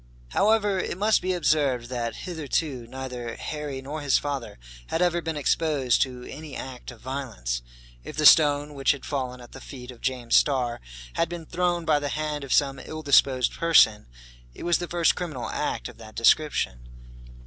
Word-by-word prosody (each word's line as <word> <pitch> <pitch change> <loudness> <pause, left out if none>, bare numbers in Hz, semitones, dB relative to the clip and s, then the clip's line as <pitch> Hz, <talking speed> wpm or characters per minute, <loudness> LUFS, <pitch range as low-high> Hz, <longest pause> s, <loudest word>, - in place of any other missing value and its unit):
However, 205 - +2
it 180 - -3
must 215 +2 +3
be 185 - -1
observed 140 -8 +1
that, 120 -2 -3
hitherto, 150 -6 -2
neither 125 -2 -6
Harry 145 -3 -5
nor 150 +3 -5
his 140 -2 +3
father 140 - -4 0.3
had - - -1
ever 175 -1 +2
been 160 -2 -3
exposed 145 -3 +1
to 125 -2 -1
any 150 +2 -9
act 130 -2 -7
of 120 -3 -12
violence. 115 - -4 0.4
If - - -9
the 155 - +1
stone 145 -1 +6
which 140 -1 +2
had 140 - -9
fallen 130 -3 -3
at 120 - -13
the - - -11
feet 125 -2 -9
of 120 - -15
James 125 -3 0
Starr 125 -4 +2 0.3
had 165 - 0
been 170 -1 -6
thrown 175 0 -1
by 150 -2 +3
the 145 0 -3
hand 150 -1 -3
of 135 - -7
some 135 -2 +2
ill 155 0 -7
disposed 135 -3 +4
person, 130 - +4 0.5
it - - -9
was 175 0 +2
the 175 - -4
first 170 -1 +3
criminal 155 -9 -5
act - - -2
of - - -13
that 110 0 -12
description. 90 - +2
140 Hz, 180 wpm, -26 LUFS, 125-160 Hz, 0.5 s, stone